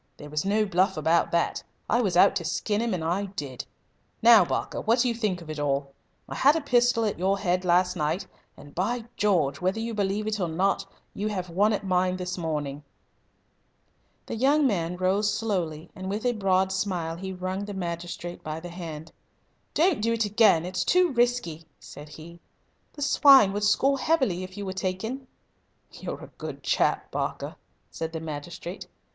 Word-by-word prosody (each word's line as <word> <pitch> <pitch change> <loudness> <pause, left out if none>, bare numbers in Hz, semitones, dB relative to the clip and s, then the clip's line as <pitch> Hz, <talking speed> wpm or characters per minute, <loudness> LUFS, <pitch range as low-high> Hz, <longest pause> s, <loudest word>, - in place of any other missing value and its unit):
There 145 0 -10
was 150 0 -1
no 210 +2 +2
bluff 190 -1 +1
about 160 +2 +2
that. 170 0 0 0.3
I 240 - +2
was 190 -6 0
out 195 - +6
to 170 - -4
skin 205 +6 -1
him, 230 -4 0
and 165 - -4
I 180 +5 0
did. 145 -10 -6 0.6
Now, 230 -2 +8
Barker, - - -3
what 225 +2 +2
do 250 +1 +2
you 240 - +1
think 210 -6 -2
of 155 - -13
it 155 - -6
all? 140 -1 -1 0.4
I - - -6
had 285 +3 +4
a 325 - 0
pistol 245 -4 +3
at 210 - -2
your 195 +2 +2
head 180 -2 0
last 180 +1 +3
night, 160 +4 -1 0.3
and, 145 - -13
by 225 +6 -1
George! 160 -10 +1
whether 185 +4 0
you 230 +1 -3
believe 205 0 -1
it 215 -1 -2
or 180 - 0
not, 190 +4 0 0.3
you 210 - -3
have 185 -4 -3
one 205 +5 +3
at 205 -1 -2
mine 185 0 +1
this 180 0 -4
morning!" 150 -4 -3 1.4
The - - -5
young 280 +5 +3
man 180 -7 0
rose 195 +3 +1
slowly, 180 -7 -2
and 190 0 -6
with 210 +4 -3
a 245 - +4
broad 190 -3 +1
smile 185 -4 -2
he 190 +2 -6
wrung 185 +2 -4
the 205 -1 -6
magistrate 175 -1 -5
by 155 +1 -4
the 175 +2 -8
hand. 160 -3 -8 0.6
"Don't 330 - +3
do 230 +2 +1
it 225 -1 +1
again. 205 -5 +4
It's 185 +1 -2
too 360 -2 +3
risky," 235 -10 0
said 145 +1 -11
he. 165 +3 -12 0.5
"The 290 - -5
swine 275 -8 +6
would 205 +1 -2
score 265 +7 +3
heavily 260 - +1
if 185 +1 -9
you 205 - -4
were 190 - -3
taken." 205 +8 -3 0.6
"You're - - -7
a - - -11
good - - -7
chap, - - +1
Barker," - - -3 0.4
said 160 0 -5
the 160 - -3
magistrate. 160 +4 -7
190 Hz, 190 wpm, -26 LUFS, 170-215 Hz, 1.4 s, Now